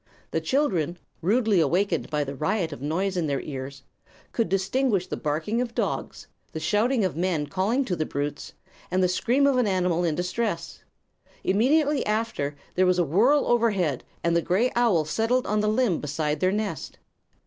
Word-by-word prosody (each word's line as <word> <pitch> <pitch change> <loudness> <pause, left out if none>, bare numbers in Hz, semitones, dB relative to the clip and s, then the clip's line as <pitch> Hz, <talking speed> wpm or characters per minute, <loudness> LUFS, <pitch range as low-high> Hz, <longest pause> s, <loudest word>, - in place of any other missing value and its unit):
The - - 0
children, 180 - 0 0.2
rudely 210 +2 +2
awakened 175 +1 +1
by 150 -1 0
the 140 0 -5
riot 165 +3 -1
of 140 - -10
noise 185 +7 -1
in 170 -3 0
their 140 -2 -1
ears, 135 -1 -7 0.5
could 230 - 0
distinguish 195 +1 +1
the - - -4
barking 160 +10 -1
of 235 -2 -4
dogs, - - -3 0.3
the 160 - -3
shouts 215 +7 +1
of 185 - -2
men 170 -3 0
calling 200 - 0
to 185 - -1
the 155 -2 -2
brutes, 145 +1 -4 0.4
and 185 +1 +1
the - - +4
scream 240 +10 +2
of 275 -2 +3
an 245 -3 +2
animal 180 -3 +1
in 165 -3 +1
deep 180 - -2
distress. 180 -4 -3 0.6
Immediately 280 +8 +2
after, 210 -10 -1 0.2
there 185 0 +3
was 180 0 +3
a 175 - +3
whirl 235 - +3
overhead 200 - +1 0.2
and 170 0 +2
the 170 - +3
gray 205 +10 +1
owl 220 -10 +3
settled 225 +9 +1
on 210 +1 0
the 210 0 +1
limb 215 -6 +1
beside 150 +1 -2
their 185 0 +2
nest. 205 -7 -3
185 Hz, 180 wpm, -25 LUFS, 160-230 Hz, 0.6 s, the